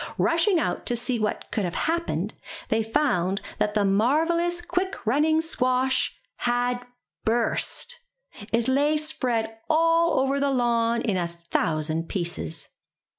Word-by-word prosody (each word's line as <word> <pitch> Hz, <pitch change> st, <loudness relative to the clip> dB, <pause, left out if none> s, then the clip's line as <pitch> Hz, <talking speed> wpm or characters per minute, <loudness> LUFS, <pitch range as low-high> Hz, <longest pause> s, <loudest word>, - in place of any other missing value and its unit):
Rushing 340 Hz, +3 st, +3 dB
out -, -, -2 dB
to 240 Hz, -, +2 dB
see 245 Hz, 0 st, -1 dB
what 215 Hz, -1 st, -2 dB
could 210 Hz, -, -1 dB
have 175 Hz, -2 st, -3 dB
happened, 335 Hz, +1 st, -1 dB, 0.4 s
they 220 Hz, +1 st, +2 dB
found 220 Hz, -, +1 dB, 0.2 s
that 210 Hz, 0 st, 0 dB
the 205 Hz, -1 st, +3 dB
marvellous 325 Hz, -, +2 dB
quick 365 Hz, +2 st, -2 dB
running 305 Hz, +7 st, +3 dB
squash 260 Hz, -4 st, +1 dB, 0.2 s
had 245 Hz, 0 st, 0 dB, 0.4 s
burst! 240 Hz, -, +1 dB, 0.5 s
It 230 Hz, +1 st, +1 dB
lay 290 Hz, +3 st, +3 dB
spread 240 Hz, -7 st, -1 dB
all 330 Hz, 0 st, +3 dB
over 270 Hz, +1 st, +1 dB
the 280 Hz, 0 st, +1 dB
lawn 235 Hz, -2 st, +1 dB
in 205 Hz, -5 st, 0 dB
a 175 Hz, -1 st, 0 dB
thousand 165 Hz, -1 st, -2 dB
pieces. 170 Hz, -, -4 dB
245 Hz, 130 wpm, -25 LUFS, 215-310 Hz, 0.5 s, Rushing